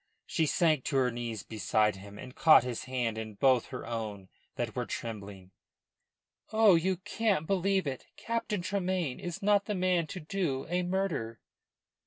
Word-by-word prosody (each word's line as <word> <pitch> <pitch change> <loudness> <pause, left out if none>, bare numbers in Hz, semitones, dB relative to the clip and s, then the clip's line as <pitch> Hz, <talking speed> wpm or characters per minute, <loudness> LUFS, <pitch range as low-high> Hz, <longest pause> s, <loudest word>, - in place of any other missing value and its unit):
She 160 - 0
sank 155 -4 +2
to 140 - -2
her 130 -2 +3
knees 115 -4 -4
beside 105 0 +1
him, 100 +1 -11
and 125 +4 -9
caught 155 -7 +7
his 125 -1 -4
hand 120 -4 -2
in 110 -1 -6
both 130 +1 +3
her - - -7
own 110 -5 -5 0.3
that - - -3
were - - -2
trembling. 100 -4 -6 1.0
"Oh, 220 -2 +6
you 180 +2 +2
can't 205 -3 0
believe 195 +1 +1
it! 135 -3 -5
Captain 230 -4 -2
Tremayne 185 -7 -1
is 180 +3 -6
not 205 0 +3
the 210 - -2
man 180 -3 +1
to 185 - -6
do 155 -5 -2
a 180 +1 +1
murder." 175 - -2
155 Hz, 165 wpm, -30 LUFS, 115-190 Hz, 1.0 s, caught